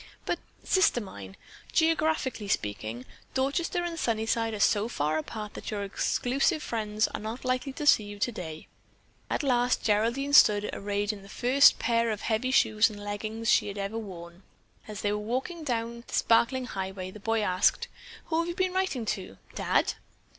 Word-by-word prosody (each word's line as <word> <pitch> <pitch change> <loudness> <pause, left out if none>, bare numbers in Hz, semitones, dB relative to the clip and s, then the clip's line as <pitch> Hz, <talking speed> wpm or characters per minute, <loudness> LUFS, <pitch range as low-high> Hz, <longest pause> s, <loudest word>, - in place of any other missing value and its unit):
"But, - - -1 0.2
Sister 375 -9 +3
mine, 100 - -9 0.4
geographically 315 -8 +1
speaking, 110 - -2 0.3
Dorchester 305 +6 0
and 335 -1 -4
Sunnyside 225 -1 0
are - - -6
so 205 +1 +3
far 155 -7 -1
apart 210 +5 -6
that - - -7
your 205 -2 -3
exclusive 270 - 0
friends 215 -1 0
are - - -5
not 220 +4 -6
likely 255 +2 0
to 295 - -5
see 215 -7 +5
you 205 0 -8
today." 180 -8 -4 0.6
At - - -1
last 250 -2 +2
Geraldine 235 +7 +1
stood 210 -7 +6
arrayed 205 +1 -1
in 205 - -10
the 195 - -14
first 260 +7 +5
pair 230 -1 +1
of 215 -2 -3
heavy 230 +3 0
shoes 220 -4 +4
and 210 -1 -9
leggins 215 +2 -4
she - - +4
had 200 0 -6
ever 200 +3 -3
worn. 175 -4 -9 0.5
As 215 -1 -6
they 205 - 0
were 210 - -1
walking 265 +9 -3
along 235 0 -2
the - - -11
sparkling 250 +3 +3
highway, 190 -3 -5
the 210 - -11
boy 225 +2 0
asked, 185 -2 +2 0.4
"Who 320 0 0
have 335 - 0
you 345 - -3
been 370 0 0
writing 370 -11 -1
to? 185 - -4 0.2
Dad?" - - +1
225 Hz, 175 wpm, -28 LUFS, 205-260 Hz, 0.6 s, stood